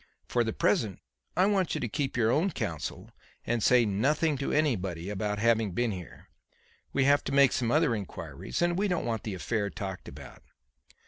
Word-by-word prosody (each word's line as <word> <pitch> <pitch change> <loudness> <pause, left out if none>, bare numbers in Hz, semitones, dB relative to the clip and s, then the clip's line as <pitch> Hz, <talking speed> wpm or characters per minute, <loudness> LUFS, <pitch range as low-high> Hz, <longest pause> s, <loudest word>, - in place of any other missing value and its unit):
For 120 - +1
the 110 - -1
present 105 -3 +1 0.4
I 185 - +5
want 195 -4 +1
you - - -2
to 120 - -1
keep 135 +4 -2
your 115 -1 +3
own 160 +9 +2
counsel 80 - -5 0.3
and 120 0 0
say 125 +2 +5
nothing 145 +10 +1
to 140 - -2
anybody 100 - 0
about 105 +1 -2
having 110 -2 +2
been 120 +4 0
here. 90 -4 -9 0.6
We 135 - +2
have 145 +1 +4
to - - -2
make 140 -1 +5
some 120 -3 0
other 155 -3 +3
inquiries 105 - -4
and 175 +1 +1
we 205 - +2
don't 180 -3 -1
want 115 -3 -1
the 105 -4 -4
affair 100 +2 -1
talked 95 -3 -6
about." - - -11
120 Hz, 190 wpm, -29 LUFS, 105-145 Hz, 0.6 s, I